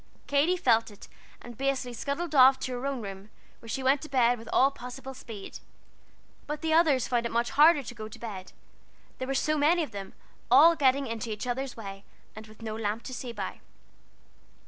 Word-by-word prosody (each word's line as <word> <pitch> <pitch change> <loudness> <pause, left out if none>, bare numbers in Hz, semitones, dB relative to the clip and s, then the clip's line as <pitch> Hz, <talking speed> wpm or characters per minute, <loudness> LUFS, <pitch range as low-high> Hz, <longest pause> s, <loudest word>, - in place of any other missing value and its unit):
Katie 295 +6 +2
felt 230 -7 +2
it, 205 - -14 0.4
and 240 -1 -10
basely 270 -2 -1
scuttled 285 +7 -4
off 265 -1 +7
to 260 - -3
her 250 +2 -3
own 270 -5 -3
room, 195 +1 -8 0.3
where 230 - -13
she 265 +4 -3
went 270 +2 +3
to 310 - -9
bed 245 -3 +3
with 230 0 -11
all 270 +2 +4
possible 265 +1 -9
speed. 225 -6 -9 0.9
But 300 0 -4
the 320 -1 0
others 310 -6 +4
found 235 -1 0
it - - -9
much 235 +1 0
harder 300 0 +5
to 240 - -8
go 215 -2 -7
to 215 - -12
bed; 195 -5 -8 0.7
there 260 - -4
were 270 - -1
so 305 +2 +1
many 330 +4 +3
of 285 - -7
them, 200 -2 -8 0.4
all 305 +7 +7
getting 275 -2 +2
into 230 -1 -4
each 215 +1 -4
other's 250 +1 -3
way, 195 -2 -8 0.3
and 215 0 -10
with 215 +1 -15
no 215 -1 -4
lamp 220 +1 -3
to 255 - -7
see 250 -1 -5
by. 205 -5 -6
250 Hz, 205 wpm, -28 LUFS, 225-280 Hz, 0.9 s, off